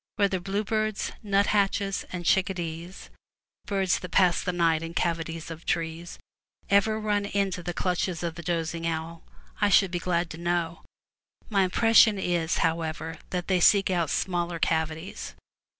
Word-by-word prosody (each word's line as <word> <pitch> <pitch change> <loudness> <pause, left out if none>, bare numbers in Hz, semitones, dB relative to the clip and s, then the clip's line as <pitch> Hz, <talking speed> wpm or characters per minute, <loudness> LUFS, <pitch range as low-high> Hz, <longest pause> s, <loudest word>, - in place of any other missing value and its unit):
Whether 195 -2 +1
bluebirds, 210 +3 -1
'^'^' - - -14
f/^i - - -23
nut 200 0 +3
hatches, 200 -1 0
and 175 -1 -5
chicka 190 +1 +2
dees 170 +1 -7 0.3
— - - -53
birds 195 -3 +1
that 180 - -7
pass 180 -2 +3
the 180 - -1
night 165 -2 +2
in 165 +1 -7
cavities 165 -1 -2
of 165 0 -9
trees 165 +1 -3 0.3
— - - -37
ever 215 +2 +3
run 205 -1 0
into 195 -3 -1
the 175 - -4
clutches 180 -1 -1
of 170 -1 -2
the 170 - -8
dozing 165 -1 -2
owl, 165 0 -4 0.4
I 205 - +4
should 195 -2 +4
be 175 - -1
glad 170 -1 -1
to 160 - -8
know. 170 -1 -1 0.7
My 195 -3 +3
impres 225 +5 +3
sion 215 -3 +7
is, 175 -3 0
however, 160 -1 -3
that 180 -1 -3
they 185 -2 +2
seek 195 +2 +5
out 170 -4 0
smaller 175 -1 -1
cavities. 160 +2 -2
175 Hz, 175 wpm, -27 LUFS, 165-195 Hz, 0.7 s, sion